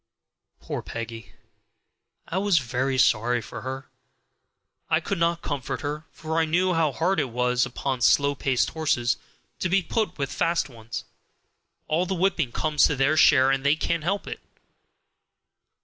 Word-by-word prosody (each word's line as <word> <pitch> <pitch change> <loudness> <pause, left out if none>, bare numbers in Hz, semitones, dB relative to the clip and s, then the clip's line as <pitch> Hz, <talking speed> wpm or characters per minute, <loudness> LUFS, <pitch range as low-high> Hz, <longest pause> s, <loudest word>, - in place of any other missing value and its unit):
Poor - - -5
Peggy! 115 0 -7 0.9
I 185 - -1
was 200 -3 +3
very 130 0 0
sorry 120 0 +3
for - - -8
her, 130 +1 -5 1.1
and - - +4
I - - +3
could 195 - -3
not 170 0 +1
comfort 140 -4 -3
her, 150 +2 -4
for 160 0 -2
I 165 - +3
knew 180 +3 +2
how 165 -3 +2
hard 180 +7 0
it 135 - 0
was 125 +1 +1
upon 130 -2 -3
slow 140 +3 +4
paced 135 -2 0
horses 145 -7 0 0.4
to 185 - -1
be 190 +1 +3
put 215 +6 -2
with 140 -2 -3
fast 170 -3 0
ones; 115 -1 -7 0.8
all 170 +4 +1
the 190 - -1
whipping 170 -7 +1
comes 150 +3 +2
to 145 - +1
their 135 +4 +2
share, 135 -3 +6
and 135 0 0
they 140 +2 +4
can't 165 0 -1
help 195 +5 -1
it. - - -6
145 Hz, 165 wpm, -25 LUFS, 130-170 Hz, 1.1 s, share